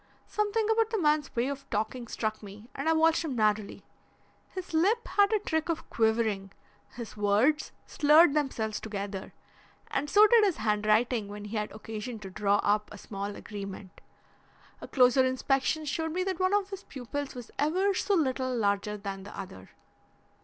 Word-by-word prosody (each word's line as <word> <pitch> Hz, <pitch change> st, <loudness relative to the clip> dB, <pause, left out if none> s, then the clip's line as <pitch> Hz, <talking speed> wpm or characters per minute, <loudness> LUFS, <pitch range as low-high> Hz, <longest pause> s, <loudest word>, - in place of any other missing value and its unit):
Something 425 Hz, +1 st, 0 dB
about 445 Hz, 0 st, +2 dB
the 445 Hz, -, -1 dB
man's 300 Hz, -5 st, +1 dB
way 240 Hz, +2 st, +1 dB
of 275 Hz, 0 st, -6 dB
talking 225 Hz, +3 st, -2 dB
struck 215 Hz, -1 st, -3 dB
me 210 Hz, +2 st, -11 dB
and 280 Hz, +4 st, -2 dB
I -, -, +5 dB
watched 320 Hz, +1 st, +3 dB
him 295 Hz, -6 st, -3 dB
narrowly. 215 Hz, -2 st, 0 dB, 0.6 s
His 370 Hz, -3 st, -7 dB
lip 405 Hz, +9 st, +2 dB
had 405 Hz, 0 st, +3 dB
a 435 Hz, -, +4 dB
trick 320 Hz, -5 st, -2 dB
of 330 Hz, -1 st, -2 dB
quivering, 220 Hz, -4 st, +1 dB, 0.4 s
his 235 Hz, -2 st, -7 dB
words 215 Hz, +9 st, +2 dB
slurred 300 Hz, +1 st, +5 dB
themselves 235 Hz, -8 st, -1 dB
together, 200 Hz, -2 st, -5 dB, 0.6 s
and 295 Hz, -, -1 dB
so 415 Hz, +5 st, +7 dB
did 455 Hz, 0 st, +6 dB
his 390 Hz, -5 st, +2 dB
handwriting 215 Hz, +1 st, +1 dB
when 205 Hz, 0 st, -8 dB
he 210 Hz, +2 st, -6 dB
had 210 Hz, -1 st, -2 dB
occasion 220 Hz, +2 st, -6 dB
to 190 Hz, -2 st, -8 dB
draw 200 Hz, +1 st, +1 dB
up 210 Hz, +1 st, +1 dB
a 210 Hz, -, -9 dB
small 200 Hz, 0 st, -6 dB
agreement. 195 Hz, -2 st, -8 dB, 0.8 s
A -, -, -7 dB
closer 255 Hz, 0 st, +4 dB
inspection 270 Hz, +4 st, 0 dB
showed 320 Hz, +2 st, -2 dB
me 365 Hz, +1 st, 0 dB
that 375 Hz, -1 st, -3 dB
one 370 Hz, +2 st, +2 dB
of 400 Hz, -1 st, 0 dB
his 390 Hz, -1 st, -6 dB
pupils 275 Hz, +2 st, -6 dB
was 245 Hz, -2 st, -9 dB
ever 370 Hz, +7 st, +2 dB
so 400 Hz, +2 st, +1 dB
little 260 Hz, -5 st, 0 dB
larger 205 Hz, -1 st, 0 dB
than 195 Hz, -1 st, -6 dB
the 200 Hz, -, -10 dB
other. 95 Hz, -, -9 dB
250 Hz, 175 wpm, -29 LUFS, 210-320 Hz, 0.8 s, so